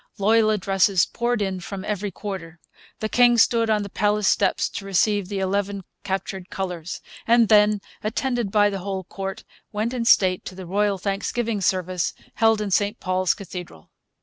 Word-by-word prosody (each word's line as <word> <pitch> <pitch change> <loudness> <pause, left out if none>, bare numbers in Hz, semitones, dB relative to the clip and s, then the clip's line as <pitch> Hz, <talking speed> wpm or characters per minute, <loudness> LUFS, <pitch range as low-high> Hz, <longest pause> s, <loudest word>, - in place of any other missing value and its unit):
Loyal 215 +2 +3
addresses 195 -2 +2
poured 235 -2 -1
in 190 -2 -2
from 190 +2 -7
every 210 -1 -2
quarter. 180 -4 -7 0.4
The 215 - 0
king 240 +1 +4
stood 230 0 +3
on 210 -1 +2
the 200 - -7
palace 210 0 +1
steps - - +2
to - - -6
receive 195 0 +1
the 200 - -3
eleven 195 +1 -1 0.2
captured 190 -1 -4
colours; 180 -3 -5 0.3
and 235 -1 +5
then, 210 -1 +5 0.2
attended 240 0 -1
by 205 0 +3
the 195 - -3
whole 190 0 -4
court, 195 +3 -6 0.3
went 220 +3 -2
in 240 -2 -2
state 185 -5 +4
to 185 - -7
the 190 -1 -8
royal 200 +2 +1
thanksgiving 205 +3 -2
service 185 -1 0 0.2
held 225 -1 +3
in 205 -2 -3
St 205 +4 +1
Paul's 185 0 +1
Cathedral. 180 - -9
200 Hz, 170 wpm, -23 LUFS, 190-215 Hz, 0.4 s, and